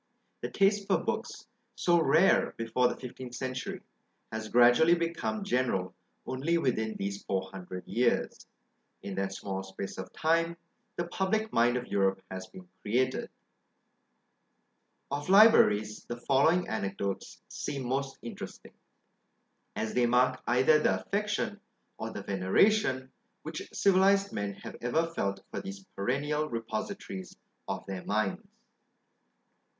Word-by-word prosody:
The - - -3
taste 200 0 +2
for - - +4
books, - - -4 0.3
so 175 -1 +3
rare 165 +4 +4
before 115 +2 +2
the - - -2
fifteenth 125 -1 -8
century, 130 0 -4 0.5
has 110 0 -4
gradually 120 +8 +6
become 170 +5 -2
general 125 - 0 0.3
only 145 +7 0
within 110 -8 0
these 100 0 -4
four 95 -1 -2
hundred 90 -1 -8
years: 120 0 0 0.6
in 100 - -5
that 95 0 -2
small 95 -1 -4
space 95 0 -7
of - - -6
time 165 +1 +1 0.4
the 175 - -2
public 195 +5 -1
mind 120 +1 +4
of 125 - -4
Europe 95 -2 +1
has 95 0 -6
been 185 -1 -13
created. 130 +4 0 1.8
Of 145 +3 -3
LIBRARIES, 110 - +6
the 120 - -5
following 140 +8 +3
anecdotes 100 -2 -3
seem 135 -3 -4
most 135 +2 -2
interesting, 115 - -8 1.0
as 110 - -2
they 125 -1 +3
mark 125 +1 +3
either 130 +6 +5
the - - +2
affection, 205 0 -2 0.4
or - - -3
the - - -6
veneration, 130 - +2 0.3
which - - -6
civilised 195 +1 +3
men 100 -1 -2
have - - -8
ever 140 +8 +1
felt 100 -9 -2
for - - -4
these 195 +1 -8
perennial 145 +8 -1
repositories 115 - -5 0.3
of - - -4
their 95 -2 -5
minds. 105 -1 0
130 Hz, 130 wpm, -30 LUFS, 105-170 Hz, 1.8 s, gradually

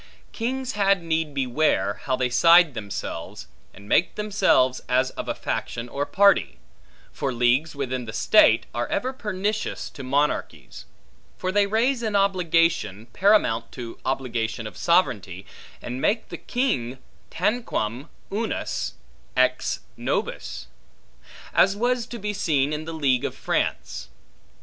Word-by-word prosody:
Kings 255 +2 -3
had 195 -3 +2
need 160 -2 -1
beware, 125 -7 0
how 130 - +1
they 130 0 0
side 165 +4 +6
themselves, 100 -4 -6 0.3
and 100 +1 -15
make 175 - +2
themselves 195 -11 +2
as 130 +1 +2
of - - -6
a - - -1
faction 115 +1 -4
or 140 +3 -3
party; 195 - +3 0.5
for 135 - -2
leagues 125 +6 +2
within 130 -3 -3
the 110 - -6
state, 165 - +5
are - - -2
ever 260 +1 -1
pernicious 210 -2 -3
to 140 - -9
monarchies: 140 +3 -2 0.5
for 185 - -2
they 200 +1 +3
raise 235 +5 +1
an 220 -3 -2
obligation, 165 - +1
paramount 125 - +3
to 120 -3 -8
obligation 115 -4 -2
of 110 - -7
sovereignty, 100 - +1 0.4
and 125 +2 -5
make 220 +2 0
the - - -6
king 135 - -1 0.3
tanquam 165 - -2 0.2
unus 220 +3 -2 0.4
ex - - +1
nobis; - - -3 0.9
as 195 +1 +4
was 240 +2 0
to 240 - -7
be 210 -1 -3
seen 150 -7 +1
in 155 +1 -4
the 165 - -5
League 135 -6 +1
of - - -3
France. - - -2
155 Hz, 135 wpm, -24 LUFS, 125-200 Hz, 0.9 s, side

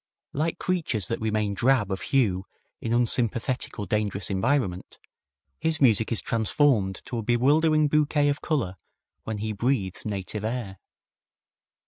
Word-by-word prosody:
Like 160 +3 -1
creatures 155 - -1
that 115 - -2
remain 105 -2 0
drab 115 -2 +2
of 95 - -2
hue 100 -9 +1 0.3
in 115 - -3
unsympathetic 120 +1 0
or 105 - -3
dangerous 100 0 -1
environment, 100 -2 -1 0.6
his 160 -1 0
music 115 -4 +3
is 115 - 0
transformed 110 -3 +1
to 120 - -4
a - - -1
bewildering 150 +7 +3
bouquet 150 0 +2
of 145 +1 0
color 120 - -1 0.5
when 110 -1 -3
he 110 +1 -3
breathes 105 -4 -1
native 105 0 -3
air. 110 -4 -4
115 Hz, 135 wpm, -26 LUFS, 100-140 Hz, 0.6 s, music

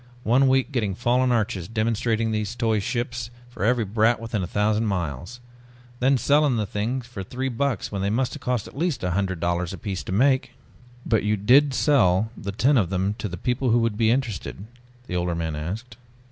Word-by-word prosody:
"One 130 +4 +4
week 130 +2 +2
getting 105 -8 -1
fallen 125 +3 +2
arches, 110 -6 0
demonstrating 115 0 0
those 110 +1 -2
toy 115 -3 +1
ships 120 +1 -3 0.2
for 110 - -6
every 115 0 +2
brat 110 +3 +2
within 115 -2 -3
a 90 - -3
thousand 105 +3 +1
miles. 90 - -3 0.6
Then 135 +2 +3
selling 145 +2 +3
the 105 - 0
things 115 +6 -3
for 125 -5 -8
three 130 +7 -3
bucks 135 0 -2
when 100 -2 -3
they 100 - 0
must 125 +4 0
have 150 - -8
cost 125 -4 -1
at - - -13
least 150 - -1
a 90 - 0
hundred 95 -1 -1
dollars 85 +2 -1
apiece 95 -3 -4
to - - -5
make." 130 +4 +2 0.5
"But 110 -3 +2
you 105 0 0
did 130 +7 +4
sell 110 -8 +3
the 100 - -5
ten 130 +7 +3
of 90 -6 0
them 95 +2 0
to 105 - -3
people 125 +6 -1
who 115 - +4
would 115 -2 +1
be 110 0 +2
interested?" 115 - -2 0.4
the 90 - -5
older 90 -1 0
man 80 -2 -3
asked. 95 +11 -6
110 Hz, 200 wpm, -24 LUFS, 100-125 Hz, 0.6 s, One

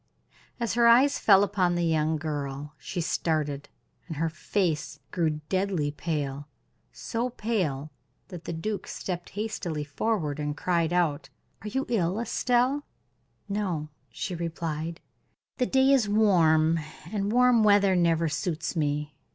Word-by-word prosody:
As 235 -1 -1
her 235 0 +4
eyes 255 +5 +5
fell 200 -2 +6
upon 185 -4 +1
the 175 0 +1
young 160 -1 +1
girl 145 -1 -4
she 170 +5 -4
started, 150 -4 -1 0.4
and 160 -4 -6
her 165 +2 0
face 160 -3 -2
grew 155 -4 0
deadly 185 -6 0
pale 145 -2 -3 0.4
so 235 +2 -3
pale 180 - -2 0.4
that 175 -4 -9
the - - -4
duke 200 +6 -4
stepped 175 -2 -5
hastily 195 -8 -3
forward, 150 -1 -1
and 145 0 -3
cried 170 -1 +1
out: 170 -5 0 0.3
"Are 215 - -7
you 265 +6 -1
ill, 195 -4 0
Estelle?" 250 +4 +1 0.6
"No," 185 -7 -2 0.2
she 190 - -4
replied; 165 -1 -4 0.6
"the 250 - +1
day 265 0 +4
is 250 -7 +3
warm, 165 -6 +4 0.3
and 205 -1 -1
warm 245 -1 +5
weather 200 -2 +5
never 165 -2 +2
suits 160 +1 -2
me. 150 -1 -1
170 Hz, 135 wpm, -27 LUFS, 155-210 Hz, 0.6 s, fell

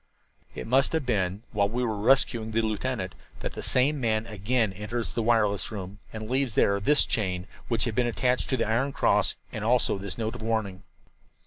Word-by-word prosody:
"It 60 - -5
must 135 +5 +3
have 160 -4 0
been 100 -3 -1
while 100 -2 +1
we 125 +3 -1
were 110 -3 -1
rescuing 115 0 +2
the 115 +1 0
lieutenant 110 -2 -2 0.3
that - - -4
the - - -6
same 135 +3 +2
man 110 -2 +1
again 110 0 0
enters 105 +4 -3
the 115 - -2
wireless 110 -3 +2
room 100 -1 -7
and 110 -1 -6
leaves 130 -2 0
there 100 0 +3
this 145 +9 +3
chain, 90 -4 -1 0.2
which 115 -3 +1
had 115 - -2
been 120 +2 +1
attached 125 +1 0
to 130 - +1
the 115 - 0
iron 130 +5 +1
cross, - - +2 0.2
and 110 - -5
also 115 -3 +2
this 100 0 -5
note 110 -1 -2
of 120 - -8
warning. 110 -4 -2
110 Hz, 200 wpm, -27 LUFS, 100-125 Hz, 0.3 s, must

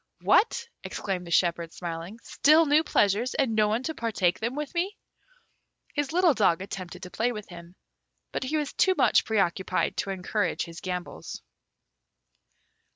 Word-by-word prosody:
"What!" 465 - +3 0.2
exclaimed 185 -3 -4
the - - -8
shepherd, 170 -1 +1
smiling; 170 +4 -6
"still 310 +3 +4
new 300 +2 +4
pleasures, 210 0 +1
and 265 -5 +1
no 215 -1 +3
one 220 +4 0
to 320 - -2
partake 205 - 0
them 235 +4 -2
with 295 -1 -4
me?" 365 +4 -1 1.0
His 290 -2 -1
little 350 -1 +4
dog 200 -8 +3
attempted 185 -1 -7
to 180 - -8
play 240 +3 0
with 210 -3 -7
him, 175 0 -12 0.6
but - - -3
he 290 +4 -1
was 295 -2 -2
too 375 -1 +3
much 275 - +4
pre 220 - -1
occupied 190 0 0
to - - -2
encourage 195 +2 -1
his 170 0 -9
gambols. 180 - -6
210 Hz, 160 wpm, -27 LUFS, 180-280 Hz, 1.0 s, still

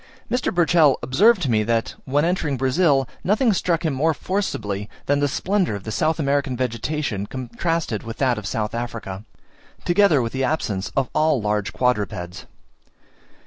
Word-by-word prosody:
Mr. 250 +1 0
Burchell 170 -4 +4
observed 190 - +4
to 130 - 0
me 110 -1 +3
that 115 +1 0
when 145 +4 +1
entering 165 -6 0
Brazil, 135 +1 +2 0.2
nothing 215 +4 +3
struck 175 -2 0
him 155 - +1
more 155 +4 +1
forcibly 105 - -3 0.2
than 145 0 +2
the 145 - +2
splendour 185 - 0
of 100 - -7
the 110 - -5
South 160 +8 +1
American 140 -3 0
vegetation 125 -3 -2
contrasted 130 +1 -2
with 115 0 -7
that 125 -5 +1
of 100 - -6
South 105 +1 -2
Africa, 115 -4 -5 0.6
together 175 -4 +4
with 115 -2 -2
the 135 0 -1
absence 110 -9 -1
of 135 -2 +2
all 155 -3 +2
large 105 -1 -1
quadrupeds. 100 -7 -2
135 Hz, 160 wpm, -22 LUFS, 110-160 Hz, 0.6 s, Burchell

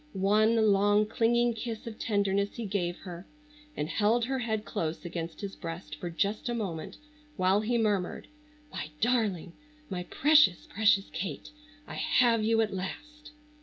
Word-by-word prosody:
One 210 +4 +3 0.2
long 205 +1 +4
clinging 235 +2 +2
kiss 225 0 -6
of 225 -2 -8
tenderness 200 -1 0
he 235 - -4
gave 180 -3 -2
her 180 -1 -9 0.5
and 150 - -1
held 220 +6 +2
her 265 +1 -2
head 220 -3 -2
close 160 +2 -3
against 165 -1 -5
his 200 -1 -5
breast 165 -3 -7
for 175 +3 -5
just 200 +7 -1
a 240 - -1
moment 180 -8 -4 0.4
while 190 +2 +3
he 235 +3 0
murmured: 205 -5 0 0.5
"My 150 - -5
darling! 215 -8 0 0.4
My 180 -1 -2
precious, 290 - +4
precious 205 -1 +2
Kate, 170 - -5 0.3
I - - -9
have 230 -3 +3
you 225 +1 +3
at 215 -3 -1
last!" 300 +11 -7
205 Hz, 155 wpm, -29 LUFS, 185-230 Hz, 0.5 s, long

